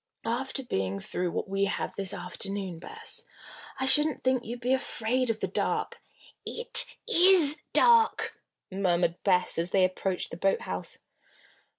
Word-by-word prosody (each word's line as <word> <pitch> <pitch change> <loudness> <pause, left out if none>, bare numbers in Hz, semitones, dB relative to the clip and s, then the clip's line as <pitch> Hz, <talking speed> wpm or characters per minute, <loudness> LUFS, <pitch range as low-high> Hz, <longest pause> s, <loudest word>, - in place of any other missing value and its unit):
"After 260 +4 -2
being 95 - -2
through 180 - -3
what - - -3
we 195 +1 0
have - - -3
this 195 -2 -1
afternoon, 185 0 -3
Bess, 450 - -4 0.6
I 265 - 0
shouldn't 295 +3 +3
think 255 -1 +1
you'd 240 +1 -6
be 250 +2 +1
afraid 255 -1 0
of 225 -1 -2
the - - 0
dark." - - -2 0.4
"It 480 0 0 0.2
is 355 -7 +5
dark," 465 -2 +4 0.4
murmured 180 -2 0
Bess, 180 -3 +2
as 170 +2 +1
they 190 0 +3
approached 185 0 -1
the - - -6
boathouse. 175 - -2
205 Hz, 145 wpm, -28 LUFS, 180-265 Hz, 0.6 s, is